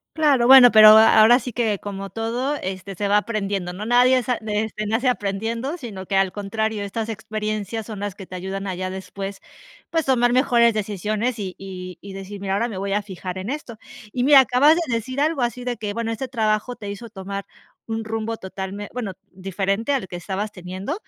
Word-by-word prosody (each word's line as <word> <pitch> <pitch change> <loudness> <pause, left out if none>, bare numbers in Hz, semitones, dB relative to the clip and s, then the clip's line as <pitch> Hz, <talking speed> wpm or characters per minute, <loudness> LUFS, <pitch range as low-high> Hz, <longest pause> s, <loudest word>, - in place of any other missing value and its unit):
Claro, 290 -6 +3
bueno, 260 -1 +10
pero, 215 -1 +9
a 220 +1 +7
ahora 240 +3 +7
sí 250 -1 -7
que 220 -4 0
como 195 -1 -6
todo, 235 +5 -2
este, 190 +1 -5
se 200 +3 -2
va 205 +1 +4
aprendiendo, 200 -4 -2
¿no?, 195 +4 -6
nadie 250 +1 +5
sa 250 +1 -1
este, 215 0 -2
nace 225 +5 +1
aprendiendo, 230 - -2
sino 200 -8 -7
que 195 - -2
al 195 -1 +3
contrario, 210 +1 -2
estas 220 +3 -4
experiencias 215 0 -4
son 215 - -6
las 205 -1 -3
que 195 -1 -11
te 185 - -8
ayudan 190 +2 -5
a 185 - -3
ya 185 +1 -4
después, 195 +1 -7 0.5
pues, 325 -2 0
tomar 245 -2 +3
mejores 240 -3 +4
decisiones 215 +3 -2
y 190 -3 -5
y 185 -2 -8
y 200 -1 -10
decir: 195 +1 -8
"Mira, 195 -1 -2
ahora 215 +4 +1
me 205 - -6
voy 195 +1 -2
a 210 - +1
fijar 190 -2 -7
en 190 +5 -5
esto", 260 -6 -6 0.3
y 245 - -1
mira, 275 0 +8
acabas 265 +5 +4
de 330 -8 -2
decir 255 +4 -3
algo 305 -1 +1
así 240 +1 -2
de 245 -1 -3
que, 210 -2 -4
bueno, 230 0 -2
este 230 +4 -4
trabajo 220 0 -1
te 205 -4 -7
hizo 225 +3 -8
tomar 200 -1 -6 0.4
un 225 0 -3
rumbo 225 0 -3
totalme 190 +2 -6
bueno, 220 -6 -4 0.2
diferente 195 +5 -2
al 235 -9 -1
que 180 - -8
estabas 195 +4 -4
teniendo, 185 - -6
215 Hz, 210 wpm, -22 LUFS, 195-240 Hz, 0.5 s, bueno